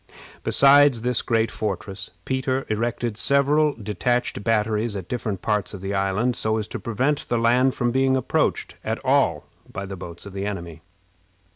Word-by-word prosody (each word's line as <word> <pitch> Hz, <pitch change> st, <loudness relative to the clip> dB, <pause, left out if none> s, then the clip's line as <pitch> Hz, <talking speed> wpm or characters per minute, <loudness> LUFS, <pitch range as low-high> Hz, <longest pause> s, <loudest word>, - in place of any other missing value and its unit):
Besides 140 Hz, -3 st, +5 dB
this 125 Hz, -1 st, +1 dB
great 115 Hz, -1 st, +1 dB
fortress, 95 Hz, -2 st, -4 dB, 0.2 s
Peter 130 Hz, 0 st, -1 dB
erected 115 Hz, 0 st, -2 dB
several 145 Hz, +4 st, +3 dB
detached 110 Hz, +1 st, -1 dB
batteries 110 Hz, 0 st, +1 dB
at 95 Hz, -3 st, -6 dB
different 105 Hz, -6 st, -4 dB
parts 105 Hz, -2 st, -1 dB
of 95 Hz, -, -9 dB
the 95 Hz, +1 st, -3 dB
island, 100 Hz, +5 st, 0 dB
so 110 Hz, -1 st, +1 dB
as 105 Hz, -1 st, -3 dB
to -, -, -5 dB
prevent 130 Hz, +6 st, -1 dB
the 120 Hz, -, +1 dB
land 125 Hz, +3 st, +3 dB
from 120 Hz, -2 st, 0 dB
being 130 Hz, +1 st, +2 dB
approached 130 Hz, -, -1 dB
at -, -, -2 dB
all -, -, +2 dB, 0.3 s
by 100 Hz, +1 st, -5 dB
the 95 Hz, 0 st, -6 dB
boats 85 Hz, -1 st, -9 dB
of 100 Hz, -, -9 dB
the 100 Hz, +1 st, -3 dB
enemy. 85 Hz, -5 st, -6 dB
115 Hz, 165 wpm, -23 LUFS, 100-125 Hz, 0.3 s, Besides